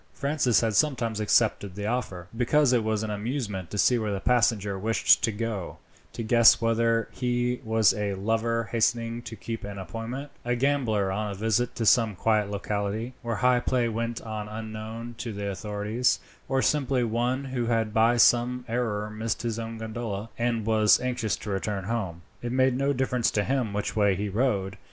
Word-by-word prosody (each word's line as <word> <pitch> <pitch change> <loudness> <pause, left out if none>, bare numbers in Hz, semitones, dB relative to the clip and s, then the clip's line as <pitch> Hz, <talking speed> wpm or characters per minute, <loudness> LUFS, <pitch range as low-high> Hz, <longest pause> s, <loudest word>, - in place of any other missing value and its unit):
Francis 140 -4 +2
had 115 -2 0
sometimes 115 -5 +1
accepted 105 -3 +1
the 105 0 -4
offer, 105 -7 -3
because 130 +3 +3
it 120 -3 +2
was 110 -1 -1
an 110 - -3
amusement 105 - -3
to 105 - -5
see 120 +4 +4
where 110 -2 -2
the 100 - -2
passenger 105 -4 +1
wished 110 +3 +3
to 115 - +2
go 105 -4 -4 0.3
to 115 - -5
guess 115 0 +6
whether 115 0 +1
he 125 -1 -1
was 110 -1 +3
a 100 -1 -2
lover 115 +2 -1
hastening 115 +1 0
to 115 - -8
keep 115 +1 -6
an 100 0 -6
appointment, 115 - -6
a 120 0 0
gambler 120 -7 +1
on 105 +2 -2
a 100 - -5
visit 110 +3 0
to 115 - -2
some 110 -2 +4
quiet 105 +1 +1
locality, 105 +3 -3
where 120 -2 -2
high 125 -1 +5
play 120 -1 0
went 115 +1 -3
on 110 -2 -5
unknown 110 +2 -6
to 120 - -4
the 100 -1 -4
authorities, 105 +5 -1 0.3
or 135 0 +1
simply 135 -4 +1
one 120 +4 0
who 130 -3 -3
had 115 -2 0
by 115 +2 +4
some 120 +1 +3
error 110 -3 -1
missed 110 +2 -3
his 115 -1 -2
own 115 0 -5
gondola, 110 -1 -5
and 115 -2 -1
was 110 -1 +4
anxious 125 -6 -1
to 105 - -7
return 100 0 -2
home. 95 -5 -3 0.2
It 120 - -4
made 130 0 +3
no 140 +2 +1
difference 125 -3 +1
to 105 - 0
him 130 -2 -1
which 105 0 -3
way 100 -3 +3
he 100 +2 -3
rowed. 100 -3 0
115 Hz, 185 wpm, -26 LUFS, 105-120 Hz, 0.3 s, guess